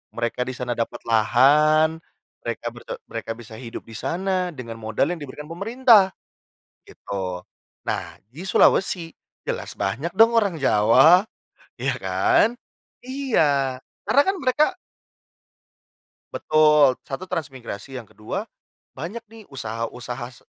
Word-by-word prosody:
Mereka 120 +1 -2
di 130 - -4
sana 125 -1 -4
dapat 120 +1 -4
lahan, 150 +8 +4 0.4
mereka 120 0 -4
berte 120 +1 -8
mereka 115 0 -5
bisa 115 -1 -11
hidup 120 -2 -8
di - - -12
sana 185 - -1
dengan 115 -3 -8
modal 110 +8 0
yang 175 - -4
diberikan 145 +1 -9
pemerintah, 215 +1 +4 0.7
gitu. 95 -2 -5 0.5
Nah, - - -3
di 155 +8 -9
Sulawesi 180 -2 +3 0.4
jelas - - -4
banyak 135 - -2
dong 230 +3 +6
orang 200 -8 +2
Jawa. 135 - +6 0.5
Iya - - -1
kan? 360 -2 +3 0.6
Iya, 155 - +1 0.3
karena 280 - +5
kan 385 - +1
mereka 260 +3 +3 1.7
Betul, 150 -3 +4
1 140 +7 -5
transmigrasi. 135 -4 -5
Yang 120 -4 -11
ke-2, 105 - -4 0.5
banyak 175 - -6
nih 225 -1 -13
usaha-usaha 120 0 -5
se - - -26
140 Hz, 120 wpm, -23 LUFS, 120-185 Hz, 1.7 s, dong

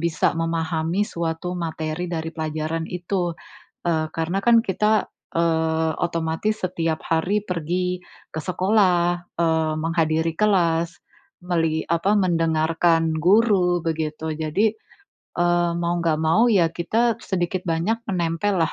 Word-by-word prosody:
bisa 165 -2 +1
memahami 165 +2 0
suatu 170 +2 -3
materi 160 +1 -3
dari 165 -1 -3
pelajaran 155 +1 -3
itu. 175 -1 -2 0.5
Eee, 160 -2 +1
karena 170 +4 -1
kan 235 -1 +6
kita, 210 +2 +2 0.3
eee, 160 -1 +1
otomatis 165 +6 -1
setiap 165 -3 -1
hari 180 +6 +1
pergi 180 +1 -2 0.3
ke 160 - -3
sekolah, 180 -1 +2 0.2
eee, 160 -2 +2
menghadiri 160 0 +1
kelas, 170 -5 +2 0.5
melih 165 -3 0
apa 180 +5 +2
mendengarkan 165 -2 +2
guru, 185 0 +3
begitu. 160 -1 -2
Jadi, 175 +8 0 0.6
eee, 175 0 +2
mau 175 0 0
enggak 165 -2 +1
mau, 165 +10 +4
ya 175 -6 +3
kita 225 +7 0
sedikit 180 -1 -2
banyak 170 +8 0
menempel 175 +2 0
lah, 160 - -3
170 Hz, 120 wpm, -23 LUFS, 160-180 Hz, 0.6 s, kan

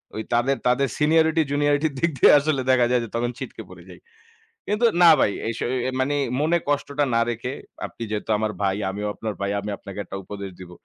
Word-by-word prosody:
ওই 110 - -3
তাদের, 130 +3 +2
তাদের 135 +2 +2
সিনিয়রিটি 160 +1 +3
জুনিয়রিটির 145 +1 +1
দিক 170 - +2
দিয়ে - - +8
আসলে 145 -2 0
দেখা 125 -2 +4
যায় 125 -1 +3
যে, 115 - -7
তখন 120 +1 0
ছিটকে - - -7
পড়ে - - -13
যাই। - - -12 0.7
কিন্তু 210 +3 0 0.2
না 170 - +9
ভাই, 100 - +3
এই 115 - -1
স - - -7 0.4
মানে 135 +2 +1 0.3
মনে 165 +3 +2
কষ্টটা 145 0 0
না 115 - +3
রেখে 120 +2 -4 0.3
আপনি - - -12
যেহেতু 105 +1 -3
আমার 110 0 -1
ভাই, 95 0 +1
আমিও 105 +2 -4
আপনার 110 -2 -5
ভাই 100 - -1
আমি 105 +1 -5
আপনাকে 100 0 -10
একটা 95 - -7
উপদেশ 100 0 -7
দিব। 90 -1 -10
125 Hz, 205 wpm, -23 LUFS, 105-145 Hz, 0.7 s, না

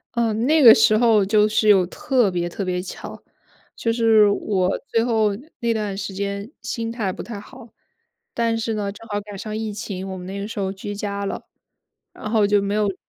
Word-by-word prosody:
嗯， 230 -1 0
那 310 +2 +4
个 230 -3 +11
时 215 -1 +4
候 225 -3 +4
就 210 +1 +3
是 215 0 +1
有 190 -3 +6
特 240 +3 +1
别 175 -1 -2
特 195 - -5
别 180 0 -1
巧。 185 - -9 0.5
就 230 - -1
是 225 -2 +5
我 195 -2 0
最 230 - +1
后 220 -4 +1 0.2
那 235 -1 0
段 210 -3 -2
时 200 0 -5
间 200 +3 -4
心 230 -1 -3
态 220 -5 -2
不 - - -7
太 225 -4 -7
好， 245 +3 -13 0.6
但 230 -1 0
是 225 0 -2
呢， 205 -2 -2
正 225 +3 -13
好 205 -2 -2
赶 205 -1 -10
上 215 +2 -6
疫 220 0 -3
情， 195 -2 -6
我 190 - -5
们 180 - -8
那 195 +2 -6
个 200 - -4
时 220 - -6
候 190 -1 -2
居 205 +1 -6
家 200 0 -4
了， - - -5 0.7
然 215 - -7
后 215 -2 +3
就 205 0 +3
没 200 +1 -2
有 210 0 +2
直 195 - -3
210 Hz, 235 characters per minute, -22 LUFS, 200-225 Hz, 0.7 s, 个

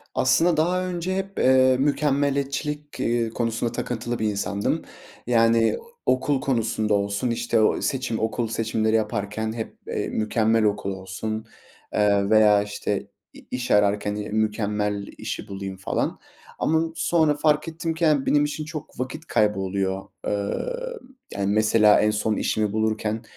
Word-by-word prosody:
Aslında 160 +6 +3
daha 180 +3 +2
önce 180 +1 -2
hep, 195 0 -4
eee, 130 0 +5
mükemmeliyetçilik, 145 +1 0
ııı, 115 -1 +1
konusunda 115 0 -1
takıntılı 120 0 -3
bir 110 - 0
insandım. 100 0 -1 0.5
Yani, 115 -1 +3 0.3
okul 130 +2 +1
konusunda 110 -4 0
olsun, 100 +4 0
işte 115 -1 +1
ooo, 110 - +2
seçim, 130 -4 -1
okul 115 +1 -1
seçimleri 110 0 0
yaparken 110 0 -1
hep, 115 -1 -6
eee, - - -2
mükemmel 110 +1 +1
okul 105 -1 0
olsun, 95 +4 -5 0.5
eee, 100 -1 +2
veya 105 -2 +5
işte 105 -1 -3 0.3
i-iş 125 -1 -5
ararken 105 0 +3 0.2
mükemmel 105 -2 -1
işi - - -5
bulayım 95 -1 -6
falan. 95 - -2 0.4
Ama 160 +1 +2
sonra 160 -3 +2
fark 150 +1 +2
ettim 165 0 -3
ki 165 +1 -5
yani 150 -4 +3
benim 145 0 +3
için 150 +1 -4
çok 155 -3 -8
vakit 135 +6 -4
kaybı 105 -2 +2
oluyor. 95 0 -2 0.2
Eee, 100 -1 -1 0.7
yani, 100 0 0
mesela 110 0 +5
en 105 0 +3
son 105 +1 0
işimi 105 -1 0
bulurken 110 0 -1
110 Hz, 140 wpm, -24 LUFS, 105-140 Hz, 0.7 s, eee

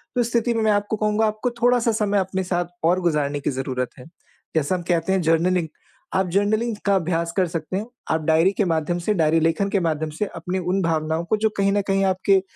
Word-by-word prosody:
तो 245 - +3
इस 235 - -1
स्थिति 235 0 +1
में 225 -1 0
मैं 215 - +3
आपको 205 +1 0
कहूँगा 215 +1 +1
आपको 215 +4 -1
थोड़ा-सा 245 -1 +3
समय 205 -1 +2
अपने 190 0 -2
साथ 175 0 +1 0.3
और 185 - +1
गुज़ारने 150 -4 0
की - - -2
ज़रूरत 130 -1 -3
है। - - -11 0.5
जैसा 160 +3 +1
हम 180 - -3
कहते 170 +2 +1
हैं 190 - +2
जर्नलिंग 165 +1 +2 0.5
आप 190 0 +2
जर्नलिंग 215 +4 +1
का 200 -1 +3
अभ्यास 170 -2 0
कर 185 -2 +3
सकते 165 +2 -4
हैं। 210 - -3 0.3
आप 160 0 +1
डायरी 160 +4 +4
के 205 - +2
माध्यम 170 +1 0
से 215 - +2
डायरी-लेखन 165 +2 +2
के 200 - +1
माध्यम 160 -3 -1
से 210 - 0
अपने 185 +1 -3
उन 185 +2 0
भावनाओं 160 0 -1
को 215 - +2
जो 220 +1 +1
कहीं 195 0 +2
न 205 - +2
कहीं 195 0 +2
आपके 190 +1 +3
185 Hz, 225 wpm, -22 LUFS, 165-205 Hz, 0.5 s, डायरी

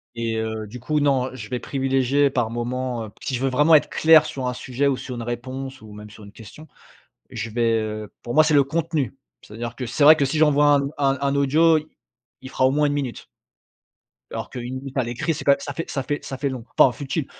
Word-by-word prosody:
et 115 -1 -2
heu, 110 -1 -3
du 120 +4 -10
coup, 150 +5 0
non, 135 -3 +1
je 110 -4 -8
vais 125 - -2
privilégier 135 +1 +1
par 120 -4 -1
moment 120 0 -3
heu, - - -11
si 135 - -3
je 125 - -2
veux 135 - +1
vraiment 150 +5 +4
être 150 - +4
clair 160 -1 +6
sur 130 -4 -5
un 125 - -3
sujet 130 +3 -2
ou 140 -2 +2
sur 125 0 -7
une 120 - -5
réponse 130 +3 -6
ou 110 -1 -12
même 105 0 -11
sur 105 0 -13
une 100 - -13
question, 115 +9 -13 0.6
je 115 0 -5
vais 115 +1 +1
heu, 110 -1 -5
pour 120 - -5
moi, 155 +1 +6
c'est 155 -1 +2
le 140 -1 +5
contenu. 155 -2 -2 0.3
C'est-à-dire 115 +3 -7
que, 125 - -4
c'est 120 +5 +1
vrai 155 +2 +9
que 145 - +1
si 140 +3 -1
j'envoie 145 -1 +4
un 140 - +1 0.2
un 135 -1 +1
un 140 0 0
audio, 155 +4 +4
il 155 - -9 0.6
il 130 - -8
fera 130 -1 +2
au 130 - +3
moins 150 +2 +2
1 145 - 0
minute 135 -4 -4 1.1
alors - - -5
qu'1 125 +1 -6
minute 135 +1 -8
à - - +3
l'écrit, 120 +7 -2
c'est 150 - -7
pas 140 -1 +5
ça 145 - -6
fait 165 +4 -5
ça 135 - -2
fait 145 +2 -3
ça 135 - -6
fait 140 +1 -1
long 130 -3 -7
enfin 130 - +7
futile. 145 +1 -3
130 Hz, 245 wpm, -22 LUFS, 120-145 Hz, 1.1 s, vrai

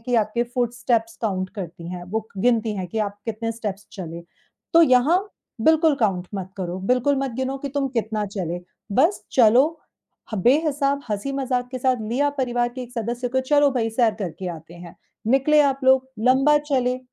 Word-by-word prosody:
कि 245 +2 -2
आपके 215 +3 -1
foot 240 -1 -2
steps 230 -2 0
count 185 -3 -1
करती 170 -2 -7
हैं, 180 -1 -6
वो 220 +4 -4
गिनती 225 0 +2
हैं 185 -2 -3
कि 220 - -4
आप 205 -1 -2
कितने 225 +1 -3
स्टेप्स 210 -3 -5
चले। 170 -4 -7 0.5
तो 335 - +7
यहाँ 285 +4 +5 0.4
बिल्कुल 320 0 +4
काउंट 190 -5 +1
मत 190 -1 -5
करो, 180 -1 -4
बिल्कुल 250 +7 +2
मत 270 -1 -1
गिनो 260 +1 -2
कि 280 +1 -5
तुम 280 0 -1
कितना 215 -1 -1
चले, 175 -3 -4 0.3
बस 325 - +2
चलो 240 +1 +6 0.7
ह - - -2
बे-हिसाब, 280 - +2
हँसी-मज़ाक 255 +3 -2
के 255 - -4
साथ 255 0 +2
लिया 280 +5 +1
परिवार 245 -2 +1
के 255 - -5
एक 245 - -10
सदस्य 240 +1 -3
को, 260 +2 +1
"चलो 285 +2 +3
भई, 230 -3 -1
सैर 225 -1 +2
करके 185 -3 -5
आते 160 +2 -14
हैं।" 175 0 -11 0.4
निकले 300 +3 +4
आप 275 -1 +1
लोग, 260 0 +4
लंबा 270 +5 +4
चले, 255 -4 0
240 Hz, 180 wpm, -23 LUFS, 205-265 Hz, 0.7 s, तो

